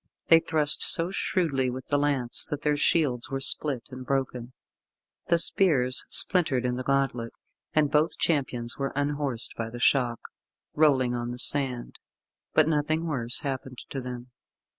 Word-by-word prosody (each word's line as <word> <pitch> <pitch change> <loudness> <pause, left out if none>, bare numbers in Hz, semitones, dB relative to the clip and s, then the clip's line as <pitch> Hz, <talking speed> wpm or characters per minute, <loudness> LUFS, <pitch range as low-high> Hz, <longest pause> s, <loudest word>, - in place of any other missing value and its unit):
They 165 - +8
thrust 155 -2 +1
so 170 +1 +3
shrewdly 140 -9 0
with 130 +1 -7
the 145 - +2
lance, 140 -4 -1
that 150 -2 -5
their 150 0 +1
shields 140 -5 +1
were 135 -1 -3
split 135 -1 +1
and 130 0 -8
broken. 125 -2 -3 0.7
The 170 - +3
spears 140 -8 +3
splintered 145 -9 +2
in 125 0 -1
the 125 - -4
gauntlet, 135 -3 -1 0.4
and 150 -2 +2
both 150 +2 +1
champions 130 -7 -1
were 135 0 -2
unhorsed 145 -4 -1
by 115 -1 -4
the 120 - -9
shock, 120 -2 +1 0.5
rolling 135 -5 +2
on 120 0 -3
the 120 - -6
sand; 130 -2 0 0.6
but 155 -1 +4
nothing 155 +1 0
worse 125 -6 0
happened 130 -2 -5
to 135 - -4
them. 125 0 -8
135 Hz, 155 wpm, -26 LUFS, 125-150 Hz, 0.7 s, They